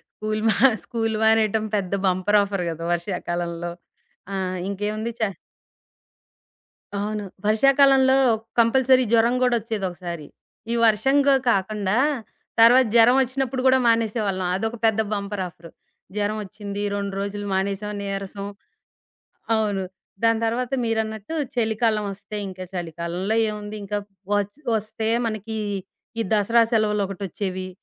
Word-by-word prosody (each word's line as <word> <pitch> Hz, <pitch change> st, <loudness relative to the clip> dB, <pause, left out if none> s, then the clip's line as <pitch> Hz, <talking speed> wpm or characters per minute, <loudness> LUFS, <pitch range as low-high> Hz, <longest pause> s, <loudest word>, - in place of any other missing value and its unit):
School 215 Hz, 0 st, -2 dB
మా -, -, +2 dB, 0.3 s
school 225 Hz, -2 st, -2 dB
మానేయటం. 220 Hz, -1 st, +3 dB
పెద్ద 195 Hz, -2 st, -2 dB
bumper 185 Hz, +3 st, +3 dB
offer 195 Hz, -2 st, -2 dB
గదా! 165 Hz, 0 st, -5 dB
వర్షాకాలంలో. 175 Hz, -1 st, -3 dB, 0.6 s
ఆ! -, -, -2 dB, 0.3 s
ఇంకేముంది. 210 Hz, +3 st, -3 dB
చ 215 Hz, -3 st, +1 dB, 1.7 s
అవును. 210 Hz, 0 st, -3 dB, 0.2 s
వర్షాకాలంలో 265 Hz, +4 st, +5 dB, 0.4 s
కంపల్సరీ 255 Hz, +2 st, +4 dB
జ్వరం 235 Hz, +2 st, +4 dB
గూడా 250 Hz, -1 st, +3 dB
ఒచ్చేది 215 Hz, -3 st, -3 dB
ఒకసారి. 175 Hz, -3 st, -7 dB, 0.5 s
ఈ -, -, +1 dB
వర్షంగా 270 Hz, +5 st, +4 dB, 0.2 s
కాకుండా, 200 Hz, +1 st, 0 dB, 0.6 s
తర్వాత 245 Hz, +3 st, +7 dB
జరం 235 Hz, +2 st, +7 dB
ఒచ్చినప్పుడు 260 Hz, 0 st, -2 dB
గూడా 260 Hz, 0 st, +5 dB
మానేసేవాళ్ళం. 215 Hz, -4 st, +1 dB
అదొక 225 Hz, +4 st, -2 dB
పెద్ద 220 Hz, 0 st, +3 dB
బంపర్ 200 Hz, -1 st, -3 dB
ఆఫరు. 165 Hz, 0 st, -14 dB, 0.5 s
జరం 210 Hz, +1 st, 0 dB
ఒచ్చింది. 200 Hz, +1 st, -6 dB
రొండ్రోజులు 200 Hz, 0 st, -3 dB
మానేసాం, 200 Hz, +2 st, -1 dB
నీరసం. 200 Hz, 0 st, -5 dB, 1.1 s
అవును. 205 Hz, -3 st, 0 dB, 0.4 s
దాని 225 Hz, 0 st, +4 dB
తర్వాత 240 Hz, +3 st, -1 dB
మీరన్నట్టు 220 Hz, +2 st, -2 dB, 0.2 s
చలికాలం 220 Hz, -2 st, +1 dB
ఒస్తే, 210 Hz, +2 st, -8 dB
ఇంకా 185 Hz, 0 st, -7 dB
చలికాలంలో 175 Hz, +4 st, -3 dB
ఏముంది, 210 Hz, 0 st, -6 dB
ఇంకా 205 Hz, +1 st, -2 dB, 0.4 s
ఒచ్ 205 Hz, +7 st, -3 dB, 0.2 s
ఒస్తే 220 Hz, +1 st, -3 dB, 0.2 s
మనకి 220 Hz, 0 st, -4 dB, 0.6 s
ఈ -, -, +2 dB
దసరా 225 Hz, +3 st, +4 dB
సెలవులు 215 Hz, -2 st, +2 dB
ఒకటి 195 Hz, 0 st, -8 dB
ఒచ్చేవి, 185 Hz, 0 st, -4 dB
210 Hz, 115 wpm, -23 LUFS, 195-225 Hz, 1.7 s, తర్వాత